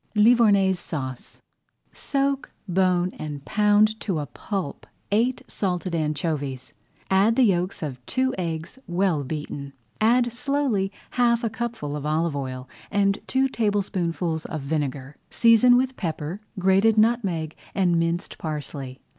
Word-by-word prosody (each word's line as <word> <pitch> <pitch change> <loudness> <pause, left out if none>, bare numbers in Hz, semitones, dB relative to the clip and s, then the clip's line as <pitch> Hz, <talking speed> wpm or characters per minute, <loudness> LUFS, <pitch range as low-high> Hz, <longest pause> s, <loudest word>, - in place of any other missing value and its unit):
LIVOURNAISE 210 -4 +5
SAUCE 130 -7 -6 0.5
Soak, 275 -1 -1 0.2
bone, 180 -1 +2
and 145 -2 -6
pound 210 +2 +3
to 190 -6 -2
a 150 - -2
pulp 190 -1 -5 0.2
eight 235 +5 +1
salted 180 -2 -2
anchovies. 150 -4 -2 0.4
Add 200 +4 +4
the 260 - +4
yolks 185 -3 +1
of 130 -5 -5
two 260 0 +1
eggs, 165 +5 -4
well 175 -4 +1
beaten. 140 -1 -5 0.3
Add 240 +1 +3
slowly 250 -6 0 0.2
half 235 -1 +2
a 225 - 0
cupful 225 -11 -4
of 145 - -5
olive 155 0 0
oil 130 -2 -5 0.2
and 200 0 +2
two 265 +1 +2
tablespoonfuls 185 -8 -1
of 155 - -4
vinegar. 140 -1 -3
Season 235 +1 +6
with 260 +1 0
pepper, 165 +1 -3 0.2
grated 195 +4 +4
nutmeg, 200 -9 +1 0.2
and 180 -3 +3
minced 170 +2 -2
parsley. 145 -4 -5
185 Hz, 130 wpm, -24 LUFS, 155-225 Hz, 0.5 s, Season